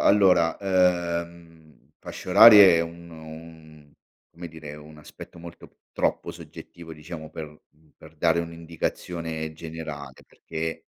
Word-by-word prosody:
allora, 90 -5 +4
ehm, 85 -4 -2
fasce - - -9
orarie 100 -2 +9
è - - +2
uno 85 0 -8
un 80 -2 -14 0.4
come 85 0 -9
dire, 80 -2 -10
un 75 +1 -14
aspetto 75 +3 -13
molto 85 0 -13 0.2
troppo - - -2
soggettivo 85 -1 -12
diciamo 80 0 -10
per 75 -1 -9 0.4
per 80 - -17
dare 85 +2 +2
un'indicazione 85 -1 -5
generale 80 -4 -9
perché 80 +1 -6
80 Hz, 115 wpm, -25 LUFS, 80-85 Hz, 0.4 s, orarie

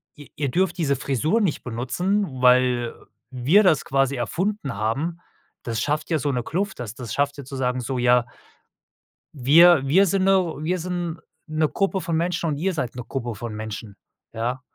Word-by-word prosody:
ihr 145 -1 -13
ihr 140 -2 -1
dürft 180 +2 +1
diese 140 -5 +1
Frisur 145 - 0
nicht 185 -8 -1
benutzen, 130 - -1 0.2
weil 125 -1 +3 0.4
wir 135 - +3
das 170 -7 +3
quasi 135 0 +1
erfunden 165 - -2
haben.“ 135 +12 -2 0.4
Das 115 -2 -2
schafft 150 +3 -1
ja 160 - +1
so 145 0 -1
'ne 125 -2 -2
Kluft, 195 +9 -3
das 115 -1 -6
das 120 -5 -6
schafft 145 +2 0
ja 140 - -8
zu 135 - -8
sagen 125 -1 -1
so: 130 +2 -3
„Ja“ 125 0 +3 1.1
„wir 155 +4 +6
wir 190 +8 +5
sind 190 +1 +1
'ne 195 - +5 0.3
wir 175 +4 -1
sind 175 -1 -4 0.3
'ne 155 -1 0
Gruppe 195 -1 -1
von 165 -3 -1
Menschen 175 0 -1
und 145 - -2
ihr 185 +5 -1
seid 125 -6 -3
'ne 125 - -5
Gruppe 120 -4 -4
von 115 0 -6
Menschen“, 110 -1 -7 0.4
ja? 120 +3 -2
140 Hz, 185 wpm, -23 LUFS, 125-175 Hz, 1.1 s, wir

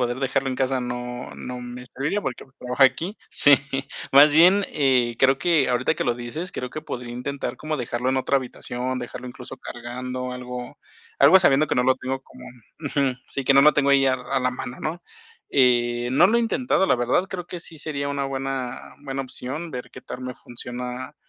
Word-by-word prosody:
poder 120 0 -1
dejarlo 135 0 0
en 130 - -2
casa 130 0 0
no 125 0 -5
no 125 0 -6
me 125 0 -8
serviría 150 +11 -2
porque 130 -6 -4
pues 135 - -27
trabajo 125 +2 -1
aquí. 165 +10 +2
Sí, 145 - +8 0.6
más 145 +2 +7
bien, 185 +5 +6
eh, 125 -5 +2
creo 135 0 +4
que 160 -1 +2
ahorita 125 +4 +1
que - - -2
lo 120 - +1
dices, 125 +10 -5
creo 125 - -5
que 155 - -6
podría 125 -5 -6
intentar 125 0 -4
como 155 0 -3
dejarlo 125 -1 -2
en 130 - +1
otra 130 +1 +1
habitación, 125 0 -4
dejarlo 125 0 -7
incluso 125 +1 -9
cargando 125 +1 -6
algo 125 0 -7 0.4
algo 190 - +8
sabiendo 155 -4 +4
que - - -1
no 125 - +2
lo 130 +1 +4
tengo 130 +1 -4
como - - -16 0.4
Ujú, 140 -2 0
sí, 140 - -3
que 135 - +5
no 135 - +7
lo 150 +2 +6
tengo 140 -1 +2
ahí 135 -1 +5
a 130 - +3
a 130 +1 -2
la 125 - +1
mano, 125 0 -7
¿no?, 165 +3 -4 0.5
eh, 120 -2 +2
no 135 +7 +6
lo 235 +3 +3
he - - +2
intentado, 230 -3 +1
la 125 - +3
verdad, 120 +10 +1
creo 180 -2 -6
que 175 0 -7
sí 165 -1 -8
sería 140 -2 -3
una 140 -1 -2
buena 135 -2 -4
buena 135 -1 -3
opción 135 +5 -5
ver 125 -3 -7
qué - - -11
tal 130 - -8
me 125 0 -5
funciona, 125 +3 -7
130 Hz, 210 wpm, -23 LUFS, 125-140 Hz, 0.6 s, Sí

